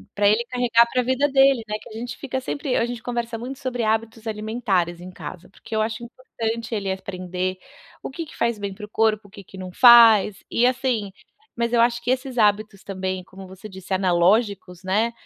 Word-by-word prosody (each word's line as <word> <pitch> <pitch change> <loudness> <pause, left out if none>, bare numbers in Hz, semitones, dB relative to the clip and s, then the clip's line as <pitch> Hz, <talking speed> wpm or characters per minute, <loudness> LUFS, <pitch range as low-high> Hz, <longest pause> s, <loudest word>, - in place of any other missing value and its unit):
pra 205 0 +3
ele 220 +3 +3
carregar 235 -1 +3
pra 255 - +2
vida 260 +3 +1
dele, 270 -3 +4
né, 210 - -3
que - - -13
a - - -12
gente 240 -1 -6
fica 260 -1 -4
sempre 275 0 -3
a 230 - +2
gente 240 -2 -6
conversa 235 -1 -3
muito 255 +4 -7
sobre 250 -3 -3
hábitos 225 +1 -1
alimentares 210 -6 -1
em 185 +1 -9
casa, 180 0 -9
porque 220 +3 -9
eu 215 - +2
acho 220 +1 -3
importante 230 -2 -5
ele 195 -2 -2
aprender 185 -1 -4 0.4
o - - -6
que 325 +5 -6
que 310 - -14
faz 235 -2 0
bem 200 -1 -5
para 210 +1 -9
o - - -18
corpo, 215 -2 +1
o - - -22
que 200 -2 -12
que 190 - -14
não 185 -1 -7
faz, 225 -4 +7
e, 240 - +2
assim 250 -6 0 0.4
mas 235 0 -1
eu 230 - +4
acho 235 0 +2
que 240 - -4
esses 260 -1 -1
hábitos 210 -1 +1
também, 185 -1 -4
como 190 0 -12
você 190 +3 -11
disse, 190 0 -7
analógicos, 185 0 +1
né, 215 +5 +1
220 Hz, 210 wpm, -23 LUFS, 195-240 Hz, 0.4 s, faz